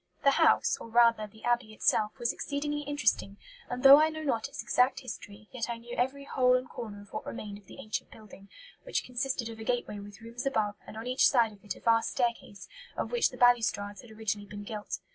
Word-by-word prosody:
"The 275 - +6
house - - +4
or, - - -8
rather, 230 -2 +4
the 220 +1 -18
Abbey 240 -2 0
itself 215 +3 +1
was 240 -2 0
exceedingly 295 +1 -3
interesting; 270 -8 0 0.3
and 250 0 -4
though 275 +2 +10
I 315 - +4
know 315 0 -6
not 235 -6 0
its - - -7
exact 250 +2 +2
history, 215 -4 -9
yet 245 -2 -4
I 235 - -3
knew 240 +1 -9
every 265 +3 -1
hole 255 -2 +3
and 255 0 -1
corner 205 -4 -8
of 205 - -20
what - - -4
remained 205 -3 -7
of 200 - -24
the - - -12
ancient 215 - -4
building, 205 -2 -14 0.3
which - - -2
consisted 250 -1 -2
of 225 -1 -8
a - - -6
gateway 240 -3 -2
with 200 0 -11
rooms 235 +3 -5
above, 215 -6 +1
and 215 - -9
on 225 - -6
each 255 +1 +4
side 235 -5 +3
of 200 -1 -18
it 205 - -4
a - - -13
vast 230 -1 +3
staircase, 235 -5 -2 0.3
of - - -2
which 480 -1 +3
the - - -11
balustrades 220 -4 +2
had 240 - -15
originally 215 -2 -3
been 205 0 -8
gilt. 210 0 -5
230 Hz, 225 wpm, -30 LUFS, 215-255 Hz, 0.3 s, though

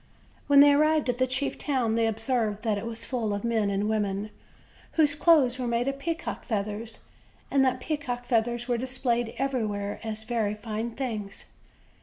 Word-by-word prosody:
When 280 -1 +7
they 290 0 +8
arrived 305 -1 +3
at 245 0 -1
the 255 - +3
chief 270 +2 -1
town 255 -6 0
they 230 0 +2
observed 225 -1 -1
that 215 -3 0
it 225 - -5
was 230 -1 -1
full 225 -5 -1
of 200 - -5
men 225 -3 +1
and 200 +1 0
women, 210 -1 -1 0.6
whose 300 -3 +4
clothes 290 -5 +4
were 250 - -1
made 235 +2 0
of 275 0 -2
peacocks' 330 +3 -4
feathers; 215 +1 -3 0.5
and 275 -1 +4
that 255 -1 +1
peacocks' 250 -4 -3
feathers 240 0 0
were 240 -2 0
displayed 240 -2 -1
everywhere 215 -7 -2
as 220 -1 -4
very 220 -3 -1
fine 220 +1 -4
things. 220 -7 -5
235 Hz, 175 wpm, -27 LUFS, 215-265 Hz, 0.6 s, they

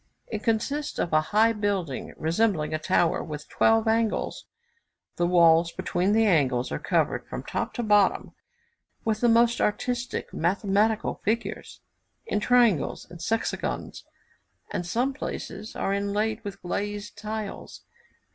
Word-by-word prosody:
It 215 -2 -5
consists 255 +7 -1
of 170 - -1
a 155 - +5
high 220 +2 +4
building, 200 - -2
resembling 165 -1 0
a 155 - 0
tower 170 +1 +1
with 150 -1 -7
twelve 225 0 +3
angles; 225 -1 0 0.7
the 175 - +2
walls 170 -1 +5
between 185 +2 0
the 225 +1 +4
angles 135 - +2
are - - -2
covered, - - 0
from - - -6
top - - -3
to 240 - -2
bottom, 210 -3 +3 0.7
with 220 -1 0
the 240 - +4
most 235 +1 +4
artistic 245 +3 -2
mathematical 200 +5 +1
figures 225 +3 -3 0.4
in 455 - -1
triangles 235 - +2
and 175 -1 -10
sexagons, 225 +6 -2 0.7
and 175 - -3
some 245 +8 0
places 220 -5 -6
are 195 - -1
inlaid 210 +3 -1
with 200 -2 -8
glazed 205 +3 -4
tiles. 215 -1 -6
205 Hz, 135 wpm, -26 LUFS, 175-225 Hz, 0.7 s, a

